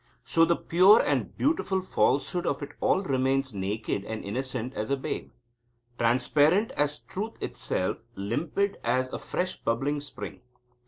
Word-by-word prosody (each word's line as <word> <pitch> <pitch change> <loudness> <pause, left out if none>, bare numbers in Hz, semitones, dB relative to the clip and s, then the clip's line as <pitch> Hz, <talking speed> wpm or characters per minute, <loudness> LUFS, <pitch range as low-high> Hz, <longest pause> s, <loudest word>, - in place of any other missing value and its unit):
So 165 +8 +4
the 170 +1 +3
pure 185 +8 +6
and - - 0
beautiful 240 -11 +1
falsehood 175 -1 +1
of 150 - -1
it 140 - -7
all 190 - +3
remains 135 - +1
naked 100 +1 -2
and 110 0 -5
innocent 125 +3 -3
as 110 - -3
a 140 - +1
babe; 135 - -4 0.7
transparent 145 - +3
as 145 0 0
truth 215 +4 -5
itself; 95 - -2 0.2
limpid 150 - -1
as 130 +2 +1
afresh 185 +1 -3
bubbling 135 +6 0
spring. 145 - -8
140 Hz, 140 wpm, -28 LUFS, 120-175 Hz, 0.7 s, pure